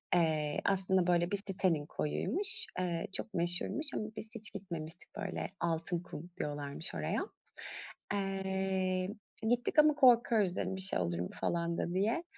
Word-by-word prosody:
Eee, 155 Hz, -3 st, +2 dB
aslında 190 Hz, -2 st, +3 dB
böyle 175 Hz, +1 st, +3 dB
bir 205 Hz, -, +2 dB
sitenin 185 Hz, -6 st, 0 dB
koyuymuş. 390 Hz, -, -1 dB
Eee, 175 Hz, -2 st, -1 dB
çok 215 Hz, -, -4 dB
meşhurmuş 180 Hz, -, 0 dB
ama -, -, -1 dB
biz 225 Hz, +2 st, -7 dB
hiç 215 Hz, -1 st, +1 dB
gitmemiştik. 170 Hz, -3 st, -6 dB
Böyle, 200 Hz, -3 st, -3 dB
"Altınkum" 170 Hz, 0 st, -2 dB
diyorlarmış 145 Hz, +1 st, -3 dB
oraya. -, -, -1 dB, 0.9 s
Eee, 190 Hz, -1 st, 0 dB, 0.4 s
gittik 245 Hz, +5 st, +1 dB
ama 300 Hz, 0 st, +8 dB
korkuyoruz. 235 Hz, -8 st, +5 dB
Dedim 190 Hz, -, -1 dB
bir -, -, -3 dB
şey 190 Hz, -, +3 dB
olur 85 Hz, -1 st, 0 dB
mu 90 Hz, -, -2 dB
falan 170 Hz, 0 st, 0 dB
da 175 Hz, -, -1 dB
diye. 220 Hz, -, +1 dB
185 Hz, 140 wpm, -34 LUFS, 170-205 Hz, 0.9 s, ama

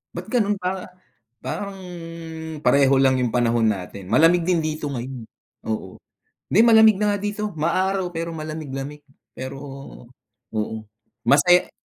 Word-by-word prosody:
Ba't -, -, -5 dB
gano'n 210 Hz, -5 st, +1 dB
pa 185 Hz, 0 st, -4 dB, 0.6 s
parang, 200 Hz, -1 st, -4 dB, 0.9 s
pareho 135 Hz, -1 st, +5 dB
lang 130 Hz, -1 st, +4 dB
yung 125 Hz, -, +1 dB
panahon 115 Hz, -1 st, +2 dB
natin, 95 Hz, -1 st, -4 dB
malamig 165 Hz, -, +5 dB
din 170 Hz, -3 st, +2 dB
dito 155 Hz, -1 st, -3 dB
ngayon. 125 Hz, -3 st, -6 dB, 0.4 s
Oo, 110 Hz, -4 st, -4 dB, 0.5 s
'di 205 Hz, -, +4 dB
malamig 220 Hz, -3 st, +7 dB
na 205 Hz, -1 st, +2 dB
nga -, -, -2 dB
dito. 210 Hz, -2 st, -3 dB
Maaraw 185 Hz, +3 st, 0 dB
pero 165 Hz, -1 st, -4 dB
malamig-lamig 150 Hz, -2 st, -6 dB, 0.3 s
pero, 130 Hz, +1 st, -7 dB, 1.0 s
oo, 110 Hz, 0 st, -2 dB, 0.5 s
mase 145 Hz, +8 st, +4 dB
155 Hz, 125 wpm, -23 LUFS, 130-190 Hz, 1.0 s, malamig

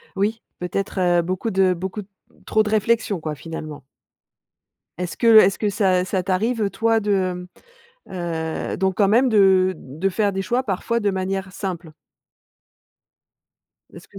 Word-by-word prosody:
Oui, 215 Hz, +4 st, -1 dB, 0.2 s
peut-être 190 Hz, +2 st, -3 dB
heu, 175 Hz, -1 st, +3 dB
beaucoup 185 Hz, +6 st, -3 dB
de 190 Hz, -1 st, +3 dB
beaucoup 190 Hz, +4 st, -5 dB, 0.4 s
trop 215 Hz, 0 st, +2 dB
de 210 Hz, -, -3 dB
réflexion 215 Hz, -2 st, +1 dB
quoi, 155 Hz, -1 st, -4 dB
finalement? 155 Hz, -2 st, -8 dB, 1.1 s
Est-ce 180 Hz, -1 st, -5 dB
que 230 Hz, -2 st, +6 dB
est-ce 195 Hz, -2 st, +5 dB
que 210 Hz, -, +1 dB
ça 185 Hz, -2 st, +2 dB
ça 185 Hz, -1 st, -1 dB
t'arrive, 220 Hz, +5 st, 0 dB
heu, 200 Hz, -, 0 dB
toi 225 Hz, +1 st, +1 dB
de 185 Hz, -3 st, -1 dB, 0.7 s
heu 165 Hz, -3 st, -3 dB
donc 190 Hz, 0 st, 0 dB
quand 200 Hz, -2 st, +3 dB
même 245 Hz, +5 st, +4 dB
de 190 Hz, -3 st, +4 dB
de 155 Hz, +9 st, -3 dB
faire 200 Hz, +1 st, 0 dB
des 195 Hz, 0 st, -2 dB
choix 245 Hz, +5 st, 0 dB
parfois 235 Hz, +2 st, -2 dB
de 205 Hz, -2 st, +1 dB
manière 190 Hz, 0 st, -3 dB
simple? 175 Hz, -5 st, -5 dB, 2.0 s
Est-ce -, -, -13 dB
que. -, -, -15 dB
190 Hz, 150 wpm, -22 LUFS, 180-215 Hz, 2.0 s, que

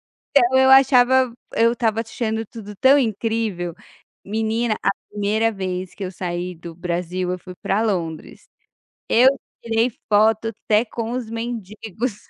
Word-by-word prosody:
Então, 260 Hz, -2 st, +2 dB
eu 265 Hz, 0 st, +5 dB
achava, 260 Hz, -1 st, +5 dB, 0.2 s
eu 230 Hz, +1 st, +4 dB
estava 225 Hz, -2 st, 0 dB
achando 225 Hz, 0 st, -3 dB
tudo 210 Hz, -1 st, -10 dB
tão 265 Hz, +8 st, +5 dB
incrível, 220 Hz, -, -1 dB, 0.5 s
menina 220 Hz, +2 st, -1 dB
a -, -, +3 dB, 0.2 s
1º 210 Hz, +2 st, +1 dB
vez 185 Hz, -3 st, -4 dB
que 200 Hz, -, -6 dB
eu 185 Hz, -, -4 dB
saí 180 Hz, 0 st, -4 dB
do 170 Hz, 0 st, -10 dB
Brasil 180 Hz, +1 st, -3 dB
eu 180 Hz, -, -3 dB
fui 180 Hz, 0 st, -11 dB
para 200 Hz, +3 st, 0 dB
Londres, 170 Hz, -7 st, -3 dB, 0.6 s
eu 245 Hz, +3 st, +6 dB, 0.4 s
tirei 230 Hz, +1 st, +1 dB, 0.2 s
foto 220 Hz, +1 st, +3 dB, 0.2 s
até 215 Hz, +2 st, +3 dB
com 230 Hz, 0 st, -5 dB
os 245 Hz, -3 st, -4 dB
mendigos. 225 Hz, -1 st, -5 dB
220 Hz, 140 wpm, -21 LUFS, 185-235 Hz, 0.6 s, eu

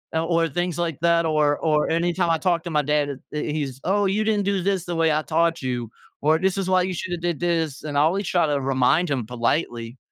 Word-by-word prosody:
Uh, 160 Hz, 0 st, +1 dB
or 165 Hz, -1 st, +2 dB
things 175 Hz, +3 st, -2 dB
like 165 Hz, -4 st, -2 dB
that, 170 Hz, 0 st, +3 dB
or 150 Hz, -2 st, +2 dB
or 155 Hz, -2 st, +1 dB
anytime 170 Hz, +1 st, +1 dB
I 165 Hz, -, +3 dB
talk 170 Hz, -1 st, 0 dB
to 175 Hz, -, -5 dB
my 150 Hz, -2 st, +2 dB
dad 150 Hz, 0 st, 0 dB
it 140 Hz, -, -6 dB
it 150 Hz, 0 st, -3 dB
he's, 140 Hz, -4 st, -3 dB
"Oh, 200 Hz, +3 st, +1 dB
you 200 Hz, +3 st, +1 dB
didn't 210 Hz, -2 st, +1 dB
do 200 Hz, -2 st, 0 dB
'this' 190 Hz, -2 st, 0 dB
the 175 Hz, -, -4 dB
way 165 Hz, -1 st, +2 dB
I 155 Hz, -, +1 dB
taught 165 Hz, +1 st, 0 dB
you," 125 Hz, -3 st, -3 dB, 0.3 s
or 155 Hz, +2 st, +3 dB
"This 190 Hz, +1 st, 0 dB
is 195 Hz, -2 st, -1 dB
why 185 Hz, 0 st, +4 dB
you 185 Hz, -, -2 dB
shoulda 175 Hz, 0 st, -4 dB
did 175 Hz, -3 st, -2 dB
'this'." 165 Hz, -5 st, -1 dB
And 145 Hz, -2 st, -3 dB
I -, -, +5 dB
always 180 Hz, +5 st, +1 dB
try 175 Hz, -3 st, +2 dB
to 145 Hz, -1 st, 0 dB
remind 135 Hz, +6 st, +2 dB
him 125 Hz, -5 st, -1 dB
politely, 120 Hz, 0 st, -2 dB
165 Hz, 250 wpm, -23 LUFS, 145-175 Hz, 0.3 s, I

